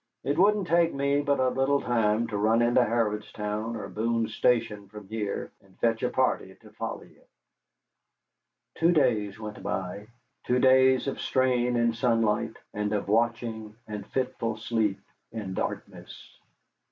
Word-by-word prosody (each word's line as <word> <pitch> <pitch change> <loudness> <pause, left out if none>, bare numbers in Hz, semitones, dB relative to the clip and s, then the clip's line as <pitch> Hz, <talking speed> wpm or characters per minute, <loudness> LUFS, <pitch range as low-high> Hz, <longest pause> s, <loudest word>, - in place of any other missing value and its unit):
It 140 - 0
wouldn't 205 +1 +4
take 170 -1 +3
me 140 +1 +1
but 140 -1 +1
a 130 0 +3
little 135 +2 +1
time 115 -2 +1
to 105 - -4
run 110 +3 +3
into 120 +1 +4
Harrodstown 105 -1 -2
or 105 -3 -5
Boone's 115 0 -1
Station 110 -5 +1
from 105 -1 -11
here, 105 -1 -4
and 95 -2 -24
fetch 115 -1 +1
a - - +1
party - - 0
to - - -16
follow - - -5
ye." - - -20 1.5
Two 165 +1 +3
days 110 - +1
went 105 -1 -7
by, 95 +3 -4 0.4
two 125 - +1
days 130 0 +5
of 135 - -3
strain 125 -2 +1
in 120 -1 +2
sunlight, 115 -2 +1 0.2
and 105 0 -2
of 100 -2 -1
watching 110 0 -1
and 105 -2 -6
fitful 120 -4 -2
sleep 110 -3 -1 0.3
in 105 -5 -5
darkness. - - -6
115 Hz, 150 wpm, -27 LUFS, 105-125 Hz, 1.5 s, days